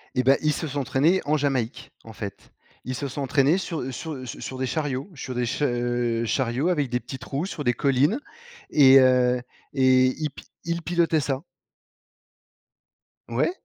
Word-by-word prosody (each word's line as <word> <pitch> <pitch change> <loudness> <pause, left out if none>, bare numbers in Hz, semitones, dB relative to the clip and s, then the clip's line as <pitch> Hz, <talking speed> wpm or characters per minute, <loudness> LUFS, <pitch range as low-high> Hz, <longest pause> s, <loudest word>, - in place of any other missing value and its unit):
Eh, 125 - +2
ben, 135 +2 +5
ils 155 0 +2
se 160 - -3
sont 145 0 -3
entraînés 145 +7 +2
en 155 +1 +2
Jamaïque, 135 -4 -2
en 110 - -11
fait. 100 -2 -8 0.3
Ils 130 0 -3
se 140 - -3
sont 140 +3 -5
entraînés 140 +4 +3
sur 160 -8 -4
sur 150 -2 -6
su - - -7
sur 130 - -6
des 130 - -1
chariots, 145 +2 -2
sur 130 -3 -6
des 125 0 0
ch 120 - -3
heu, 120 -2 0
chariots 130 +6 0
avec 150 -7 0
des 125 +1 0
petites 130 -2 -8
roues 145 +7 -3
sur 155 -6 -5
des 120 - +3
collines, 140 - +2 0.5
et 135 -2 +8
heu, 125 -1 +4 0.3
et 130 -1 +5
ils 155 -1 -2
pi 140 - -13 0.2
ils 170 0 -2
pilotaient 170 -1 +1
ça. 135 -2 -2 1.9
Ouais. - - +1
135 Hz, 180 wpm, -25 LUFS, 125-150 Hz, 1.9 s, et